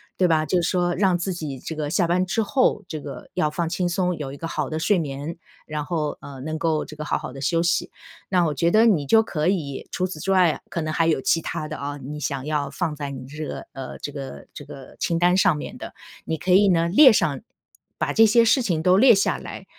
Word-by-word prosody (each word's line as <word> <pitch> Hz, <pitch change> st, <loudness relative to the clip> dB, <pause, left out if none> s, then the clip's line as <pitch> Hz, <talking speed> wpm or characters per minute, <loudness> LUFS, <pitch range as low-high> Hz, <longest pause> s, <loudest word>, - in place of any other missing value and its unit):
对 185 Hz, -, +3 dB
吧？ 155 Hz, -2 st, +2 dB
就 180 Hz, +2 st, +1 dB
是 170 Hz, -, 0 dB
说 175 Hz, -1 st, +1 dB
让 185 Hz, -1 st, +2 dB
自 185 Hz, +2 st, -3 dB
己 155 Hz, -6 st, -5 dB
这 160 Hz, +5 st, -7 dB
个 150 Hz, -1 st, -3 dB
下 175 Hz, +3 st, +2 dB
班 175 Hz, +2 st, +1 dB
之 225 Hz, +5 st, 0 dB
后， 255 Hz, +5 st, +1 dB
这 155 Hz, -, -5 dB
个 140 Hz, -3 st, -9 dB
要 155 Hz, -, +1 dB
放 165 Hz, +2 st, -2 dB
轻 175 Hz, +1 st, -1 dB
松， 180 Hz, 0 st, 0 dB
有 145 Hz, -4 st, -6 dB
一 140 Hz, -, -9 dB
个 165 Hz, -, -5 dB
好 150 Hz, -4 st, -3 dB
的 155 Hz, -, -3 dB
睡 185 Hz, +4 st, +2 dB
眠， 145 Hz, +1 st, -5 dB, 0.3 s
然 150 Hz, -1 st, -4 dB
后， 155 Hz, -2 st, -2 dB
呃， 140 Hz, -2 st, -10 dB
能 155 Hz, +3 st, -4 dB
够 160 Hz, -2 st, 0 dB
这 155 Hz, -, -11 dB
个 150 Hz, -, -6 dB
好 -, -, -1 dB
好 -, -, -7 dB
地 135 Hz, -, -9 dB
休 165 Hz, +4 st, +1 dB
息。 170 Hz, -, 0 dB, 0.4 s
那 180 Hz, -2 st, +3 dB
我 155 Hz, -, 0 dB
觉 165 Hz, +5 st, +1 dB
得 220 Hz, +5 st, +5 dB
你 170 Hz, -11 st, +2 dB
就 225 Hz, +9 st, +5 dB
可 155 Hz, -6 st, -2 dB
以 155 Hz, -8 st, -2 dB
除 185 Hz, -, -1 dB
此 185 Hz, -4 st, -6 dB
之 195 Hz, -, -2 dB
外 185 Hz, -3 st, +5 dB
啊， -, -, -7 dB
可 170 Hz, -, -3 dB
能 155 Hz, 0 st, -3 dB
还 165 Hz, +1 st, +2 dB
有 160 Hz, -4 st, +2 dB
其 165 Hz, +5 st, +1 dB
它 155 Hz, -1 st, -4 dB
的 155 Hz, 0 st, -6 dB
啊， 145 Hz, +1 st, -5 dB
你 145 Hz, +2 st, -7 dB
想 140 Hz, -3 st, -3 dB
要 150 Hz, -2 st, -1 dB
放 165 Hz, -5 st, -3 dB
在 145 Hz, -1 st, -5 dB
你 130 Hz, -2 st, -7 dB
这 150 Hz, +3 st, -7 dB
个 -, -, -6 dB
呃， 135 Hz, -1 st, -7 dB
这 145 Hz, -, -6 dB
个 135 Hz, -, -8 dB
这 -, -, -9 dB
个 135 Hz, -1 st, -12 dB
清 170 Hz, -, 0 dB
单 175 Hz, +1 st, +3 dB
上 190 Hz, -4 st, +3 dB
面 -, -, -7 dB
的。 -, -, -9 dB, 0.3 s
你 160 Hz, -, -2 dB
可 185 Hz, -, -2 dB
以 195 Hz, +2 st, +6 dB
呢 170 Hz, -2 st, +3 dB
列 260 Hz, -, +7 dB
上， 145 Hz, -9 st, +1 dB, 0.6 s
把 -, -, -1 dB
这 225 Hz, -, +6 dB
些 230 Hz, +2 st, +5 dB
事 230 Hz, +4 st, +4 dB
情 170 Hz, -9 st, -1 dB
都 185 Hz, +1 st, +5 dB
列 245 Hz, +1 st, +7 dB
下 195 Hz, -, +1 dB
来， -, -, -9 dB
165 Hz, 280 characters per minute, -23 LUFS, 150-180 Hz, 0.6 s, 列